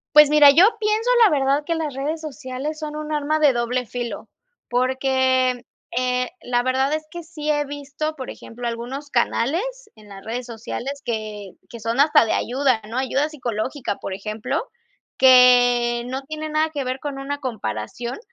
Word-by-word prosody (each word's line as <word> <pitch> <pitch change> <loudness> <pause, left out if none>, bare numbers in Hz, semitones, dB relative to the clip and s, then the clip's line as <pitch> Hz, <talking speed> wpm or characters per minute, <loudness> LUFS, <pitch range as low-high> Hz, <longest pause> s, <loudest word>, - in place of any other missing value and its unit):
Pues, 300 -1 +9
mira, 300 -1 +8
yo 335 +7 +7
pienso, 435 +3 0 0.2
la 405 - +4
verdad, 280 0 +2
que 335 - 0
las 310 -4 -3
redes 300 +4 -3
sociales 295 0 -5
son 305 -1 -6
un 305 0 -5
arma 300 +1 0
de 295 -2 +5
doble 240 0 -1
filo, 240 +1 -5 0.4
porque, 260 0 +1 0.3
eh, 250 0 0
la 245 0 +1
verdad 265 +3 +1
es 310 - -1
que 345 -1 -8
sí 310 -2 -6
he 295 -1 +1
visto, 290 +2 -5
por 260 -4 -7
ejemplo, 240 +1 -7
algunos 250 +5 -5
canales 255 - +1 0.3
en 210 -1 -17
las 195 -1 -11
redes 240 +3 -4
sociales 245 +4 -6
que 215 -4 -5
que 235 - -10
son 230 +4 -2
hasta 290 -4 +5
de 220 - 0
ayuda, 255 -2 +1
¿no? 240 +4 -3
Ayuda 270 +3 0
psicológica, 250 -4 -3
por 195 - -6
ejemplo, 215 +2 -3 0.6
que 245 -2 +6
no 260 +2 -4
tiene 310 +2 -6
nada 310 +1 +1
que 290 -3 -3
ver 255 +1 -3
con 285 -2 -5
una 285 +1 -4
comparación, 230 - -4
260 Hz, 175 wpm, -22 LUFS, 240-295 Hz, 0.6 s, Pues